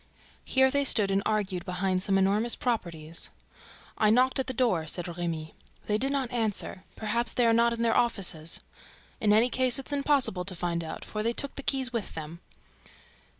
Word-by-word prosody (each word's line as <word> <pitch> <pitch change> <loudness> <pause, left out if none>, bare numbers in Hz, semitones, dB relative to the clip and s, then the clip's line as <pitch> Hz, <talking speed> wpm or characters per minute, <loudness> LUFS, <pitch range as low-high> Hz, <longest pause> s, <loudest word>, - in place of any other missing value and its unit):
Here 265 0 +3
they 280 +1 +2
stood 210 -7 +4
and 195 0 +2
argued 200 -4 -1
behind 185 0 -1
some 195 0 +1
enormous 205 +5 +2
"properties." 170 -9 -3 0.7
"I 215 - +4
knocked 255 +4 +3
at 265 - -1
the - - -2
door," 225 -12 0
said 175 +2 -3
Remy. 170 -2 -4 0.3
"They 210 0 0
did 270 +3 +2
not 270 -3 -1
answer. 220 -5 -2
Perhaps 225 +2 -1
they 245 - +2
are 230 - +4
not 235 +1 +4
in 235 0 -2
the 230 -1 +2
office. 185 -9 0 0.6
In 210 - +2
any 225 +4 +4
case, 255 -2 +3
it's 270 +2 -5
impossible 275 -9 +1
to 185 0 -2
find 170 -1 -2
out, 160 - -7
for 215 - -4
they 230 +2 0
took 280 +3 +1
the - - -6
keys 265 -2 0
with 230 -4 -4
them." 160 +1 -7
215 Hz, 190 wpm, -28 LUFS, 180-250 Hz, 0.7 s, stood